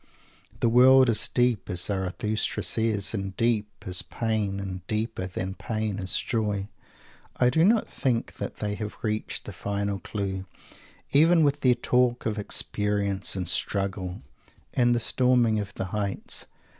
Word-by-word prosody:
The - - +3
world 130 +2 +6
is 110 - +2
deep, 120 -4 +1
as 90 -3 0
Zarathustra 100 +3 -1
says, 110 -3 0
and 95 -3 -4
deep 115 -3 +1 0.2
is 90 -1 +1
pain; 110 -4 -2
and 95 -2 -5
deeper 110 -3 -2
than 95 0 -4
pain 110 -1 -3
is 95 -1 0
joy. 105 -4 -1 0.7
I 125 0 +3
do 160 +3 +3
not 220 +4 +4
think 120 -3 -2
that - - -5
they 105 -1 -2
have 105 0 -5
reached 110 -1 -3
the - - -7
final 100 -1 -2
clue, 95 0 -4 0.6
even 160 +3 +5
with 145 0 +1
their 125 -2 +4
talk 125 0 +1
of 110 -1 -1
"experience" 100 -1 0
and 90 -2 -3
"struggle" 95 0 -1 0.5
and 120 -1 +3
the - - +1
"storming 120 -2 +3
of 100 -1 -4
the - - -3
heights." 100 -2 -2
105 Hz, 150 wpm, -26 LUFS, 100-120 Hz, 0.7 s, world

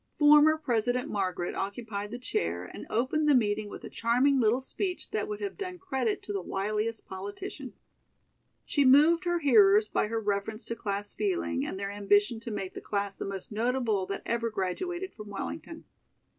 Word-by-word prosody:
Former 300 +1 +7
President 245 -3 0
Margaret 185 -3 -1
occupied 205 0 -4
the 240 - -5
chair 85 - -2
and - - -9
opened 285 +7 +1
the 290 - +6
meeting 210 -3 +1
with - - -9
a - - -6
charming 255 +4 +3
little 230 +1 +3
speech 360 +7 -4
that - - -1
would 420 0 -4
have 400 0 -4
done 365 -2 -4
credit 265 - -2
to 205 - -5
the 195 - -1
wiliest 215 +4 -2
politician. 200 - -7 0.9
She 285 - +2
moved 305 +7 +6
her 345 0 +2
hearers 210 -6 +6
by 210 - 0
her 225 +1 -1
reference 210 +1 -2
to 230 - -3
class 205 -2 -4
feeling 355 -9 -1
and 285 -10 -4
their 200 0 -3
ambition 205 +3 +2
to 230 - -7
make 195 -3 -4
the - - -7
class 200 -1 -2
the - - -5
most 195 0 -6
notable 225 -3 0
that 195 - -4
ever 235 0 0
graduated 345 - -3
from 210 -1 -10
Wellington. 85 - -6
225 Hz, 180 wpm, -29 LUFS, 200-280 Hz, 0.9 s, Former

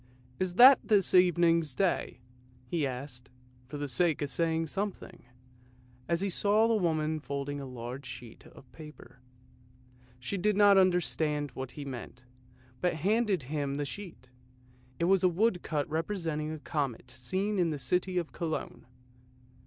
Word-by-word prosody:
" 125 +1 -29
Is 185 -1 -1
that 255 +4 +9
this 205 -4 +2
evening's 170 -5 +4
Day?" 185 -9 -1 0.4
he 150 +2 -1
asked, 125 -1 -8 0.4
for 145 - -7
the 145 0 -3
sake 155 +3 +1
of 145 - -2
saying 165 +3 0
something, 195 -4 -5 0.8
as 170 +1 +1
he 200 - 0
saw 210 +4 +3
the 230 - +2
woman 160 -6 0
folding 140 0 -4
a 135 - -7
large 125 +2 -7
sheet 120 -3 -10
of 130 - -17
paper. 150 -5 -13 1.0
She 125 +11 -4
did 210 +2 +1
not 205 -1 +7
understand 160 -5 +1
what 130 -1 -7
he 145 - -7
meant, 125 -2 -8 0.6
but 180 -3 +1
handed 200 - +1
him 140 0 -3
the 145 0 -2
sheet. 170 -5 -9 0.7
It 170 - 0
was 190 +1 +3
a 185 - +5
woodcut 175 -6 0
representing 160 -2 -2
a 155 - -5
comet 135 -5 -4
seen 185 +12 -2
in 175 -2 +2
the 155 - -3
city 180 +5 -1
of 170 -3 -2
Cologne. 160 -7 -5
160 Hz, 155 wpm, -30 LUFS, 140-185 Hz, 1.0 s, that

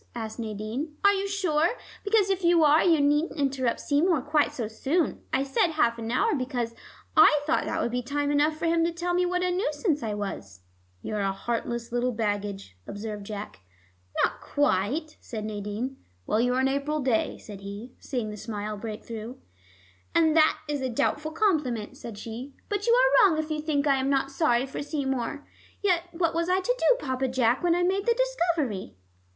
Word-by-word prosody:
asked 220 -1 -5
Nadine. 225 +8 -4
"Are 400 - +7
you 395 0 -1
sure? 365 0 +1 0.3
Because 405 -2 +3
if 380 -1 -1
you 340 -1 +5
are, 300 +1 +5
you 330 -3 +4
needn't 295 +3 +1
interrupt 265 -3 0
Seymour 300 0 +2
quite 300 0 +2
so 230 -4 -3
soon. 275 +8 -1
I 265 - +2
said 275 +5 +1
half 235 -6 +2
an 225 0 -4
hour, 255 - +2
because 250 -4 -2 0.4
I 295 - +7
thought 320 +2 +1
that - - -2
would 235 - 0
be 250 +1 -1
time 285 +3 -1
enough 300 +2 +2
for 330 - -3
him 330 0 +3
to 340 - 0
tell 345 +1 -2
me 360 0 +2
what 360 0 0
a 365 - +1
nuisance 360 -5 0
I 215 -2 -2
was 100 - -6 0.2
" 90 0 -37
"You're 215 - -3
a 195 -1 +1
heartless 235 +3 -3
little 245 +1 0
baggage," 205 - -3
observed 205 -1 -6
Jack. 210 -1 -6 0.6
"Not - - 0
quite," 290 - 0
said 215 -3 -6
Nadine. 215 +5 -4 0.3
"Well, 215 - +1
you're 250 +1 +2
an 265 - +3
April 280 +3 -1
day," 250 -4 +1
said 205 -2 -10
he, 200 +5 -8
seeing 235 -5 -3
the 210 - -7
smile 210 -1 -5
break 215 0 -6
through. 230 +2 -7 0.8
"And 320 -2 +4
that 315 -1 +5
is 290 -2 -2
a 260 - -1
doubtful 290 +5 0
compliment," 300 - 0
said 225 -3 -8
she. 235 +6 -7
"But 410 +2 -2
you 470 - +5 0.3
are 400 - +7
wrong 320 - 0
if 310 0 -2
you 305 0 -1
think 300 -2 0
I 275 -2 +4
am 265 +1 0
not 275 0 +1
sorry 270 -4 +2
for 270 - -6
Seymour. 280 -2 -3 0.4
Yet 355 -4 +2
what 335 -1 0
was 335 +1 0
I 370 +1 +3
to - - 0
do, - - +4
Papa 260 0 0
Jack, 250 -1 +2
when 345 -1 +3
I 355 - +1
made 385 +3 0
The 470 - +4
Discovery?" 340 - -1
275 Hz, 200 wpm, -27 LUFS, 230-330 Hz, 0.8 s, Are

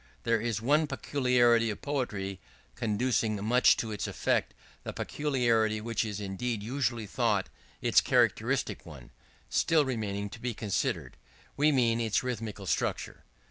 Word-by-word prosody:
There 110 - +1
is 115 -2 -2
one 150 +5 +3
peculiarity 120 -5 +2
of 105 - -6
poetry 105 -9 -3 0.3
conducing 110 - 0
much 125 +3 +5
to 110 - -3
its 105 - -3
effect - - 0 0.3
the - - -5
peculiarity 120 -7 +1
which 115 +1 -1
is 105 -2 -4
indeed 105 +2 -3
usually 120 -2 -1
thought 95 - 0 0.3
its - - +5
characteristic - - +1
one - - -12 0.4
still 160 -3 +2
remaining 105 -5 -2
to 115 - -9
be 120 -1 -3
considered: 105 -3 -2 0.4
we 150 +2 +3
mean 120 -4 +2
its 110 -1 +1
rhythmical 110 -5 -4
structure. - - -2
115 Hz, 140 wpm, -29 LUFS, 105-125 Hz, 0.4 s, much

